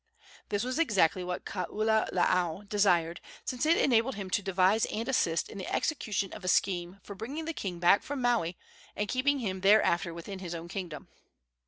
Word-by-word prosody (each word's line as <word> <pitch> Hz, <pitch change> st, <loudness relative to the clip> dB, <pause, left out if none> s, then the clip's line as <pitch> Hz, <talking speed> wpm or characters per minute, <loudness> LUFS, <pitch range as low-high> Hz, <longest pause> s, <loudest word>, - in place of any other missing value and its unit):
This 205 Hz, +1 st, 0 dB
was 255 Hz, +4 st, -2 dB
exactly 195 Hz, -, +2 dB
what 180 Hz, 0 st, -4 dB
Kaululaau 190 Hz, -2 st, 0 dB
desired, 180 Hz, -5 st, +2 dB, 0.2 s
since 255 Hz, +4 st, -1 dB
it 330 Hz, -, +5 dB
enabled 245 Hz, +1 st, +2 dB
him 195 Hz, -2 st, -6 dB
to 205 Hz, -, +2 dB
devise 195 Hz, +2 st, +2 dB
and 225 Hz, +2 st, -4 dB
assist 170 Hz, -11 st, +1 dB
in 200 Hz, -, -9 dB
the 185 Hz, -, -5 dB
execution 215 Hz, -, -1 dB
of 210 Hz, -, -9 dB
a -, -, -5 dB
scheme 180 Hz, 0 st, +1 dB
for 200 Hz, -, -8 dB
bringing 270 Hz, +11 st, -5 dB
the 330 Hz, -, -3 dB
king 185 Hz, -, -4 dB
back 175 Hz, +3 st, +5 dB
from 285 Hz, -1 st, -5 dB
Maui 235 Hz, -9 st, +1 dB, 0.4 s
and 210 Hz, -, -2 dB
keeping 275 Hz, +4 st, +1 dB
him 190 Hz, -7 st, -3 dB
thereafter 195 Hz, -4 st, +4 dB
within 170 Hz, +4 st, -7 dB
his 175 Hz, -2 st, -5 dB
own 165 Hz, 0 st, -7 dB
kingdom. 175 Hz, -6 st, -6 dB
200 Hz, 180 wpm, -30 LUFS, 180-230 Hz, 0.4 s, it